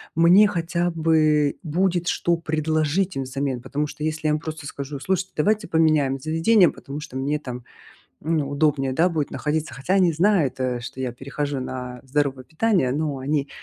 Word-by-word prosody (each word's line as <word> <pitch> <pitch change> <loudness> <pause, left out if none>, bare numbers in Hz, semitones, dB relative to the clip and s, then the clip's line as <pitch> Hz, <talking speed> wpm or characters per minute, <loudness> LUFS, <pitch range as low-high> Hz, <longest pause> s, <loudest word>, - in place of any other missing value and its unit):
мне 175 +6 +6
хотя 175 -2 -1
бы 155 -3 +2
будет, 175 +2 0
что 170 -1 +1
предложить 155 +3 0
им 135 - -1
взамен. 130 -1 -3
Потому 145 +3 -2
что 150 - -8
если 155 0 -2
я 150 - +3
вам 155 - 0
просто 155 -1 -6
скажу: 140 0 -6
"Слушайте, 190 +3 -2
давайте 210 +6 +1
поменяем 155 -4 +2
заведение, 165 +6 +4
потому 140 +2 -8
что 150 -4 -7
мне 145 +3 0
там, 125 -4 -7 0.6
ну, 155 -3 0
удобнее, 145 -2 +1
да, 170 +6 +3
будет 155 -4 -2
находиться". 150 -3 -2
Хотя 140 +9 -1
они 180 -4 +4
знают, 170 -4 +2
э, 125 -1 -1
что 130 +2 -7
я 125 -2 -2
перехожу 140 +2 -4
на 125 -1 -6
здоровое 135 -1 -1
питание, 175 - +1
но 145 -2 -2
они 140 +1 -1
150 Hz, 175 wpm, -23 LUFS, 135-165 Hz, 0.6 s, мне